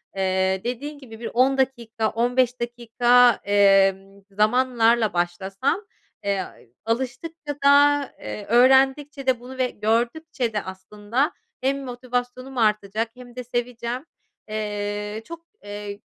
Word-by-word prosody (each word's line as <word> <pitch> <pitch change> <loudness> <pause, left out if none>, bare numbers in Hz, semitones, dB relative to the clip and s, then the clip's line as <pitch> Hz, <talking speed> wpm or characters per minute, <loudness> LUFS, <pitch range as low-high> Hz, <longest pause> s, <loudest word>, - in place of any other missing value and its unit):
Eee, 190 0 +1
dediğin 275 +5 -4
gibi 225 -5 -12
bir 235 - -5
10 260 +3 +3
dakika 235 -4 -1
15 245 +2 +1
dakika, 240 +1 +4
emm, 195 -1 +3
zamanlarla 230 +1 +2
başlasam, 190 - -1 0.4
eee, 200 -2 0 0.4
alıştıkça 265 +6 -3
da, 285 0 +6 0.2
eee, 205 - -6
öğrendikçe 265 +4 +3
de 255 -2 +2
bunu 255 +2 -10
ve 255 -1 +1
gördükçe 235 +5 -1
de 210 - 0
aslında 205 - -2 0.3
hem 275 +1 0
motivasyonum 250 +1 -4
artacak 215 0 +1
hem 245 -1 -13
de 250 - -5
seveceğim. 240 +2 -4 0.4
Eee, 210 0 -3
çok, 335 +3 -10 0.2
eee, 205 0 -7
240 Hz, 115 wpm, -23 LUFS, 210-260 Hz, 0.4 s, da